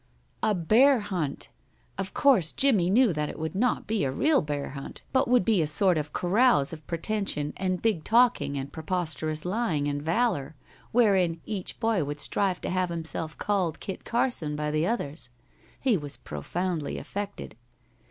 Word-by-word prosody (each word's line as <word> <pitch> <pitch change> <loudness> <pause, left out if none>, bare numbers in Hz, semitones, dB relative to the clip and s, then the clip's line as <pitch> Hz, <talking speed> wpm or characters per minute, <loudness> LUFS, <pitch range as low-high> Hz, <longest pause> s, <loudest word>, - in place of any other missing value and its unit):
A 215 -1 +2
bear 235 - +5
hunt! 180 -9 -4 0.5
Of 195 -1 -4
course 220 - +3
Jimmie 215 -11 +3
knew 225 0 +4
that 150 -1 -2
it - - -7
would 160 -1 -4
not 240 +5 0
be 215 -4 0
a 135 - 0
real 300 - +3
bear 145 -2 -3
hunt, 140 0 -9
but 260 0 +3
would 245 -6 +3
be 215 -6 +3
a 155 - +1
sort 185 +4 +3
of 150 -1 -3
carouse 185 - +3
of 155 -2 -10
pretension 170 -4 -2
and 185 -1 -2
big 215 -9 +1
talking 230 - +3
and 135 +1 -5
preposterous 160 -2 -2
lying 180 -7 0
and 145 0 -2
valor, 160 - 0 0.4
wherein 190 -8 +3
each 200 -4 -5
boy 225 -7 +1
would 145 +1 -5
strive 190 +3 0
to - - -3
have 185 -1 0
himself 165 -1 -4
called 190 -6 -1
Kit 190 - -6
Carson 235 - 0
by 150 0 -2
the 155 +3 +1
others. 150 - -3 0.5
He 250 -7 +2
was 145 -4 -5
profoundly 155 - -3
affected. 205 - -6
180 Hz, 170 wpm, -27 LUFS, 150-215 Hz, 0.5 s, bear